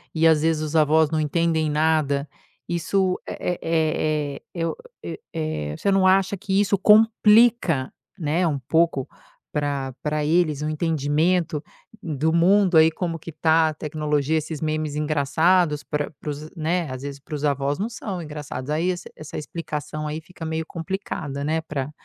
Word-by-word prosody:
e 160 +1 +2
às 160 -2 +4
vezes 160 -1 +1
os 155 +1 -4
avós 155 0 +4
não 160 - +1
entendem 160 +1 +1
nada, 150 -2 +1 0.4
isso 185 +2 0
é 180 - -3
é 155 -3 0
é - - -14
eu 165 -2 -2 0.3
eu - - -5 0.2
eh, 155 - -3
você 200 - +1
não 195 -1 +3
acha 190 +1 +3
que 195 0 0
isso 200 -1 +3
complica, 210 - +4 0.2
né, 165 +1 0
um 150 -3 0
pouco 160 0 +1 0.4
para, 140 -3 -2
para 150 0 -1
eles 155 -2 +2
o 150 - -1
entendimento 155 +1 0 0.4
do 160 -1 0
mundo 180 +1 +4
aí 160 +1 +7
como 165 0 -3
que 165 +1 -9
tá 160 +1 +3
a - - -4
tecnologia, 150 0 -1
esses 155 0 -4
memes 155 -1 -2
engraçados 150 +2 +2
para 145 +3 -3
para - - -6
os, 150 +2 -6
né 165 +1 -1
às 130 0 -6
vezes 140 0 -6
para 140 - -11
os 150 0 -3
avós 140 0 0
não 210 +4 -1
são 200 -6 -5
engraçados, 150 -4 -6
aí 160 +4 +1
esse, 180 -1 -4
essa 155 -1 -8
explicação 155 -1 -5
aí 155 +1 -4
fica 170 0 -10
meio 160 0 -2
complicada, 165 -5 -4
né, 160 +2 0
para, 145 -3 -4
155 Hz, 170 wpm, -23 LUFS, 150-170 Hz, 0.4 s, aí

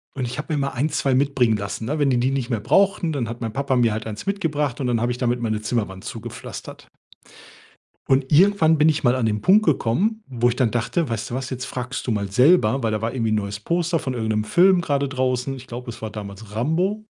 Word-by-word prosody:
Und 130 -2 -2
ich 125 - -5
habe 155 +1 -4
mir 150 - 0
mal 140 0 0
1, 140 +5 -1
2 135 -2 0
mitbringen 130 -5 +2
lassen, 100 +2 -5
ne? 150 +5 -2
Wenn 140 -2 +2
die 125 - +2
die 130 +2 +1
nicht 135 -2 -2
mehr 115 -4 0
brauchten, 195 - +2
dann 125 -6 -2
hat 120 - -7
mein 115 -2 -3
Papa 135 0 0
mir 115 -3 +3
halt 110 +1 -4
1 110 - -6
mitgebracht 150 -9 -1
und 130 - -1
dann 115 -2 +1
habe 120 +1 0
ich 125 - -3
damit 120 -1 0
meine 110 -2 -2
Zimmerwand 105 -5 -3
zugepflastert. - - -8 1.2
Und 135 +1 +2
irgendwann 165 -2 +5
bin 155 +1 +5
ich 155 -1 0
mal 120 - +4
an 125 -3 0
den 105 -1 -1
Punkt 210 +3 +5
gekommen, 180 - +1
wo 120 -1 +1
ich 120 - -1
dann 120 -4 +2
dachte: 120 +8 -1
„Weißt 115 0 -3
du - - -4
was, 130 0 -4
jetzt 130 0 -4
fragst 125 0 -5
du - - -1
mal 100 -2 -1
selber.“ 125 - +4
Weil 110 - +1
da 105 - -1
war 115 +2 -2
irgendwie 115 -4 0
'n - - +2
neues 100 0 -3
Poster 170 +5 0
von 130 -3 -4
irgend'nem 110 -2 -1
Film 180 - +4
grade 140 -3 0
draußen. 130 0 -1
Ich 130 -1 -10
glaube, 120 0 -6
es 115 - -11
war 110 - -4
damals 105 0 -9
Rambo, 180 - 0
125 Hz, 250 wpm, -22 LUFS, 115-150 Hz, 1.2 s, irgendwann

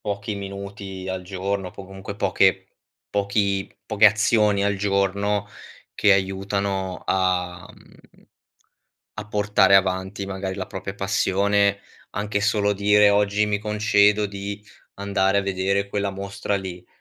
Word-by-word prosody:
pochi 100 0 -4
minuti 100 -1 -7
al 95 0 -3
giorno, 95 0 -3
po 100 - -10
comunque 95 +1 -8
poche 100 - +2 0.4
pochi 100 -1 0 0.2
poche 110 +1 +5
azioni 105 -1 +3
al 100 0 +1
giorno, 100 +1 0 0.5
che 100 - +5
aiutano 95 0 -1
a 90 -2 0
mhmm, - - -20 0.9
a 110 -1 -7
portare 105 -1 +4
avanti 95 +1 -1
magari 95 -1 -4
la 95 - -4
propria 95 +1 -6
passione. 100 +1 +1 0.3
Anche 100 0 -2
solo 105 -1 +2
dire: 105 +1 +4
"Oggi 105 +1 +2
mi 105 -1 0
concedo 105 0 +2
di 100 +1 -6 0.3
andare 100 0 +1
a - - +3
vedere 100 +1 -1
quella 100 0 -1
mostra 100 +1 -4
lì. 90 -2 -7
100 Hz, 125 wpm, -23 LUFS, 95-105 Hz, 0.9 s, poche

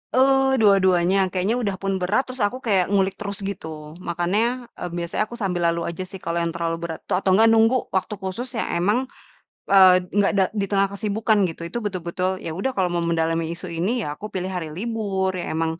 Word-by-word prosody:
Eee, 270 0 +4
dua-duanya. 190 -2 +4
Kayaknya 195 +5 +1
udah 200 -2 -1
pun 195 -1 -1
berat 210 +9 +2
terus 255 -3 -5
aku 255 - -6
kayak 195 -7 +2
ngulik 195 -1 +2
terus, 200 -1 -4
gitu. 160 -5 -7
Makanya 215 +9 -1
eee, 180 - -4
biasanya 170 +4 -1
aku 240 - -8
sambil 180 -3 -1
lalu 170 0 -1
aja 180 +2 -5
sih 190 - -8
kalau 170 0 -2
yang 170 0 -1
terlalu 165 -1 -1
berat. 165 -2 -4
To - - 0
atau 190 -1 +2
enggak 225 +3 +6
nunggu 225 +3 +4 0.2
waktu 190 +3 0
khusus 190 +7 -4
yang - - -2
emang, 205 +8 +2 0.7
eee, 190 -2 +8 0.2
enggak 205 -1 +3
da 190 - +5
di 200 -2 -1
tengah 195 -1 +2
kesibukan, 215 +1 0
gitu. 165 - -10
Itu 240 - -4
betul-betul, 185 0 -2
ya - - -4
udah 265 +7 0
kalau 185 -2 +2
mau 170 -1 0
mendalami 165 0 0
isu 180 0 -8
ini, 220 +7 0
ya 145 - -3
aku 210 - -6
pilih 185 0 -2
hari 175 -4 -4
libur. 200 -2 -1
Ya - - -3
emang 160 0 -1
190 Hz, 210 wpm, -23 LUFS, 170-210 Hz, 0.7 s, eee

